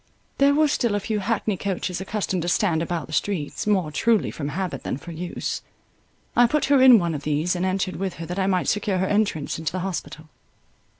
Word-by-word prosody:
There 280 Hz, +1 st, +5 dB
were 310 Hz, +1 st, +4 dB
still 235 Hz, -6 st, 0 dB
a -, -, +1 dB
few 210 Hz, +1 st, -2 dB
hackney 210 Hz, 0 st, -1 dB
coaches 185 Hz, -1 st, -3 dB
accustomed 190 Hz, -2 st, -2 dB
to 170 Hz, -, -3 dB
stand 175 Hz, -2 st, +2 dB
about 165 Hz, -3 st, -2 dB
the 155 Hz, -, -11 dB
streets, 165 Hz, +1 st, -2 dB
more 185 Hz, -7 st, +1 dB
truly 225 Hz, +6 st, +2 dB
from 145 Hz, -, -5 dB
habit 155 Hz, -2 st, -3 dB
than -, -, -3 dB
for 170 Hz, +4 st, -10 dB
use. 175 Hz, +2 st, -4 dB, 0.7 s
I 245 Hz, 0 st, +6 dB
put 300 Hz, +5 st, +1 dB
her 270 Hz, -, +5 dB
in 255 Hz, -2 st, +9 dB
one 170 Hz, -4 st, 0 dB
of 145 Hz, -, -4 dB
these, 155 Hz, +4 st, 0 dB
and 175 Hz, -, -2 dB
entered 185 Hz, 0 st, -1 dB
with 190 Hz, -1 st, -3 dB
her 165 Hz, -, -6 dB
that 180 Hz, +4 st, -4 dB
I 190 Hz, -, +1 dB
might 185 Hz, -2 st, +1 dB
secure 205 Hz, -2 st, 0 dB
her 185 Hz, -, +1 dB
entrance 195 Hz, -8 st, 0 dB
into 160 Hz, -2 st, -2 dB
the 185 Hz, -, -3 dB
hospital. 160 Hz, -3 st, -5 dB
185 Hz, 220 wpm, -24 LUFS, 165-210 Hz, 0.7 s, in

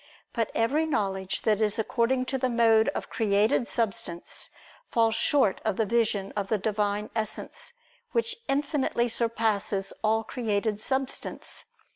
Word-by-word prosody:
But 230 Hz, -3 st, 0 dB
every 290 Hz, +8 st, +2 dB
knowledge 195 Hz, -8 st, -1 dB
that 215 Hz, -1 st, +2 dB
is 210 Hz, 0 st, +1 dB
according 235 Hz, +3 st, +1 dB
to 265 Hz, +1 st, -2 dB
the 255 Hz, 0 st, +1 dB
mode 225 Hz, -2 st, +4 dB
of -, -, -5 dB
created 215 Hz, +2 st, +2 dB
substance, 195 Hz, -6 st, -1 dB, 0.4 s
falls 225 Hz, -1 st, +3 dB
short 260 Hz, -5 st, +2 dB
of 215 Hz, -3 st, 0 dB
the 225 Hz, -, +2 dB
vision 210 Hz, -3 st, +1 dB
of 200 Hz, -2 st, -1 dB
the 215 Hz, -, +1 dB
Divine 210 Hz, 0 st, -1 dB
Essence, 230 Hz, -, -4 dB, 0.4 s
which 465 Hz, -1 st, 0 dB
infinitely 275 Hz, -3 st, +1 dB
surpasses 220 Hz, -4 st, 0 dB
all 220 Hz, +1 st, +2 dB
created 215 Hz, -2 st, -1 dB
substance. 265 Hz, +2 st, -3 dB
225 Hz, 135 wpm, -27 LUFS, 205-245 Hz, 0.4 s, mode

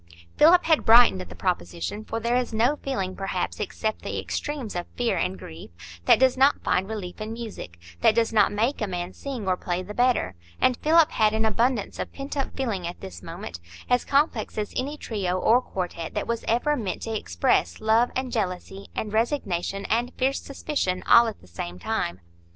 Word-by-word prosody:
Philip 350 Hz, +3 st, +6 dB
had 320 Hz, -2 st, +3 dB
brightened 225 Hz, -, +7 dB
at 90 Hz, -, -9 dB
the 90 Hz, -, -10 dB
proposition, 85 Hz, -, -3 dB
for 225 Hz, -, -4 dB
there 235 Hz, +2 st, 0 dB
is 245 Hz, -2 st, 0 dB
no 245 Hz, +7 st, +3 dB
feeling, 195 Hz, -11 st, -3 dB
perhaps, 195 Hz, -2 st, -3 dB
except 215 Hz, +1 st, -3 dB
the -, -, -4 dB
extremes 285 Hz, -9 st, -4 dB
of 175 Hz, 0 st, -3 dB
fear 240 Hz, -1 st, +1 dB
and 95 Hz, +1 st, -1 dB
grief, 80 Hz, -1 st, -10 dB, 0.4 s
that -, -, +7 dB
does 260 Hz, -1 st, +4 dB
not 270 Hz, +2 st, +3 dB
find 190 Hz, +2 st, +1 dB
relief 205 Hz, -3 st, -6 dB
in 215 Hz, +1 st, -4 dB
music,—that 90 Hz, -, -2 dB
does 230 Hz, -1 st, +2 dB
not 210 Hz, -2 st, +4 dB
make 230 Hz, +7 st, 0 dB
a 215 Hz, -, 0 dB
man 180 Hz, 0 st, -4 dB
sing 255 Hz, -8 st, -6 dB
or 185 Hz, -, +3 dB
play 180 Hz, 0 st, -3 dB
the 205 Hz, +3 st, -8 dB
better; 245 Hz, -, +2 dB, 0.3 s
and 255 Hz, -, +3 dB
Philip 320 Hz, 0 st, +4 dB
had 215 Hz, -1 st, +3 dB
an 220 Hz, 0 st, +1 dB
abundance 230 Hz, 0 st, 0 dB
of -, -, -4 dB
pent 275 Hz, +1 st, -6 dB
up 275 Hz, -2 st, -3 dB
feeling 210 Hz, -10 st, -2 dB
at 175 Hz, -, -7 dB
this 85 Hz, -2 st, -9 dB
moment, 85 Hz, 0 st, -7 dB, 0.3 s
as 245 Hz, 0 st, +4 dB
complex 275 Hz, -7 st, +1 dB
as 210 Hz, -1 st, -3 dB
any 285 Hz, +4 st, -2 dB
trio 195 Hz, -9 st, -2 dB
or 235 Hz, +6 st, +4 dB
quartet 180 Hz, -7 st, -5 dB
that -, -, -1 dB
was 235 Hz, 0 st, -2 dB
ever 245 Hz, +6 st, +2 dB
meant 215 Hz, -9 st, -4 dB
to 225 Hz, -1 st, -3 dB
express 85 Hz, -, +1 dB
love 225 Hz, +3 st, +3 dB
and 260 Hz, -1 st, -2 dB
jealousy 195 Hz, -3 st, -3 dB
and 210 Hz, -1 st, -3 dB
resignation 195 Hz, -, -1 dB
and 240 Hz, +3 st, 0 dB
fierce 265 Hz, +1 st, +1 dB
suspicion, 275 Hz, -10 st, -2 dB
all 235 Hz, 0 st, +7 dB
at 220 Hz, -, -6 dB
the -, -, -18 dB
same 85 Hz, 0 st, -6 dB
time. 90 Hz, 0 st, -2 dB
220 Hz, 195 wpm, -25 LUFS, 180-250 Hz, 0.4 s, brightened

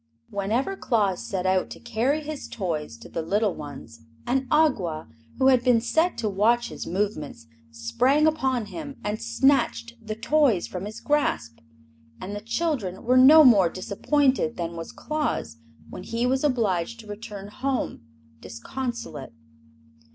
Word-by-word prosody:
Whenever 220 Hz, -, -1 dB
Claus 205 Hz, -, 0 dB
set 190 Hz, -2 st, -3 dB
out 185 Hz, 0 st, +1 dB
to -, -, -9 dB
carry 240 Hz, +6 st, 0 dB
his 300 Hz, -1 st, -6 dB
toys 155 Hz, -, -4 dB
to -, -, -12 dB
the 165 Hz, -, -4 dB
little 200 Hz, +4 st, +1 dB
ones 115 Hz, -6 st, -10 dB, 0.2 s
an 265 Hz, +1 st, 0 dB
Awgwa, 215 Hz, -, +1 dB, 0.3 s
who 265 Hz, -, +4 dB
had 255 Hz, -2 st, +4 dB
been 245 Hz, -2 st, +4 dB
set 320 Hz, +9 st, +1 dB
to 225 Hz, -, -1 dB
watch 225 Hz, +4 st, +2 dB
his -, -, -7 dB
movements, 175 Hz, -, -3 dB, 0.2 s
sprang 240 Hz, -, +1 dB
upon 265 Hz, -7 st, +1 dB
him 285 Hz, +5 st, -7 dB
and 210 Hz, +2 st, -3 dB
snatched 235 Hz, 0 st, +1 dB
the 215 Hz, -1 st, -5 dB
toys 245 Hz, -, +2 dB
from 185 Hz, +1 st, -6 dB
his 210 Hz, +1 st, -8 dB
grasp. 285 Hz, -, 0 dB, 0.6 s
And 200 Hz, +2 st, -6 dB
the 205 Hz, -, -5 dB
children 230 Hz, -, -2 dB
were 250 Hz, +2 st, +2 dB
no 290 Hz, +5 st, +9 dB
more 205 Hz, -, +6 dB
disappointed 240 Hz, -, 0 dB
than 170 Hz, -1 st, -4 dB
was 165 Hz, 0 st, -7 dB
Claus 300 Hz, -, -3 dB, 0.3 s
when -, -, -7 dB
he 230 Hz, +1 st, -2 dB
was 260 Hz, +2 st, +1 dB
obliged 230 Hz, -, 0 dB
to -, -, -16 dB
return 205 Hz, -1 st, -8 dB
home 265 Hz, +5 st, -2 dB, 0.4 s
disconsolate. 235 Hz, -, -6 dB
230 Hz, 150 wpm, -25 LUFS, 190-265 Hz, 0.6 s, no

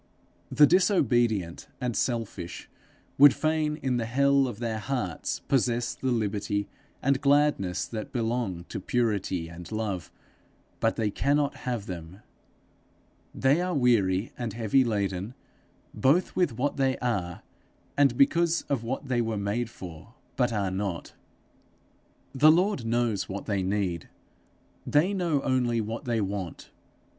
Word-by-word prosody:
The 150 Hz, -, +6 dB
disobedient 120 Hz, -, +2 dB
and 125 Hz, -3 st, -2 dB
selfish 115 Hz, -8 st, -3 dB, 0.5 s
would 145 Hz, -2 st, +9 dB
fain 155 Hz, -1 st, 0 dB
in 130 Hz, -2 st, +1 dB
the 115 Hz, -2 st, -2 dB
hell 140 Hz, +2 st, +3 dB
of 120 Hz, -, -6 dB
their 115 Hz, -2 st, -3 dB
hearts 105 Hz, -, -3 dB
possess 120 Hz, -2 st, 0 dB
the 130 Hz, -, -3 dB
liberty 105 Hz, -2 st, -1 dB, 0.4 s
and 135 Hz, 0 st, +2 dB
gladness 140 Hz, -11 st, +2 dB
that 110 Hz, -2 st, -6 dB
belong 115 Hz, -7 st, -2 dB
to -, -, -4 dB
purity 100 Hz, -6 st, -1 dB
and 85 Hz, +2 st, -10 dB
love, 105 Hz, -5 st, -3 dB, 0.7 s
but 115 Hz, -, +1 dB
they 110 Hz, -2 st, 0 dB
cannot 145 Hz, +5 st, +1 dB
have 120 Hz, -5 st, -2 dB
them; 90 Hz, +1 st, -8 dB, 1.1 s
they 140 Hz, +6 st, +3 dB
are 180 Hz, -1 st, -1 dB
weary 110 Hz, -6 st, +2 dB
and 120 Hz, -4 st, -3 dB
heavy 115 Hz, +4 st, +2 dB
laden, 100 Hz, -1 st, -2 dB, 0.6 s
both 160 Hz, +8 st, +2 dB
with 165 Hz, -11 st, +1 dB
what 145 Hz, +3 st, -1 dB
they 135 Hz, -1 st, +1 dB
are, 95 Hz, -9 st, -2 dB, 0.5 s
and 140 Hz, -4 st, +3 dB
because 170 Hz, +4 st, +3 dB
of 135 Hz, -5 st, 0 dB
what 130 Hz, +4 st, -4 dB
they 125 Hz, -2 st, +1 dB
were 110 Hz, -2 st, -2 dB
made 105 Hz, +4 st, -1 dB
for 95 Hz, +2 st, -11 dB, 0.2 s
but 125 Hz, -2 st, +1 dB
are 100 Hz, -4 st, -1 dB
not. 95 Hz, -2 st, -4 dB, 1.2 s
The 150 Hz, +3 st, +6 dB
Lord 175 Hz, -, +1 dB
knows 115 Hz, -4 st, 0 dB
what 100 Hz, +1 st, -5 dB
they 100 Hz, -3 st, 0 dB
need; 95 Hz, -4 st, -2 dB, 0.7 s
they 165 Hz, +7 st, +2 dB
know 170 Hz, -7 st, 0 dB
only 125 Hz, -3 st, +1 dB
what 110 Hz, +5 st, -4 dB
they 115 Hz, -3 st, 0 dB
want. 95 Hz, -3 st, -5 dB
120 Hz, 135 wpm, -27 LUFS, 100-135 Hz, 1.2 s, would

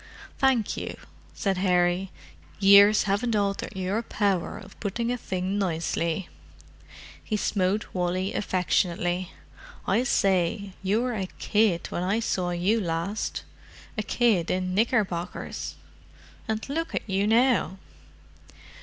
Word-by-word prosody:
"Thank 260 Hz, -5 st, +2 dB
you," -, -, -5 dB, 0.4 s
said 195 Hz, -4 st, -1 dB
Harry. 180 Hz, 0 st, +2 dB, 0.5 s
"Years 200 Hz, +1 st, +7 dB
haven't 215 Hz, +3 st, 0 dB
altered 200 Hz, -1 st, -1 dB
your 190 Hz, +4 st, -1 dB
power 200 Hz, -6 st, -1 dB
of -, -, -13 dB
putting 230 Hz, +3 st, -2 dB
a -, -, 0 dB
thing 190 Hz, 0 st, -2 dB
nicely!" 170 Hz, -1 st, -1 dB, 1.0 s
He 215 Hz, -, -1 dB
smote 200 Hz, 0 st, 0 dB
Wally 185 Hz, +1 st, -1 dB
affectionately. 180 Hz, -1 st, 0 dB, 0.6 s
"I 240 Hz, -, +3 dB
say, 195 Hz, -3 st, +1 dB
you 205 Hz, +5 st, +1 dB
were 250 Hz, -1 st, -1 dB
a 195 Hz, -4 st, -2 dB
kid 210 Hz, -5 st, +2 dB
when -, -, -2 dB
I 195 Hz, +5 st, +1 dB
saw 185 Hz, -5 st, -1 dB
you 185 Hz, +6 st, +1 dB
last: 170 Hz, +4 st, -2 dB, 0.5 s
a 215 Hz, -, -1 dB
kid 215 Hz, -5 st, +2 dB
in 185 Hz, 0 st, -1 dB
knickerbockers. 200 Hz, -5 st, -1 dB, 0.7 s
And 220 Hz, 0 st, -2 dB
look 325 Hz, +4 st, -3 dB
at -, -, -3 dB
you 195 Hz, +1 st, +1 dB
now!" 230 Hz, -4 st, +3 dB
195 Hz, 120 wpm, -26 LUFS, 180-215 Hz, 1.0 s, Years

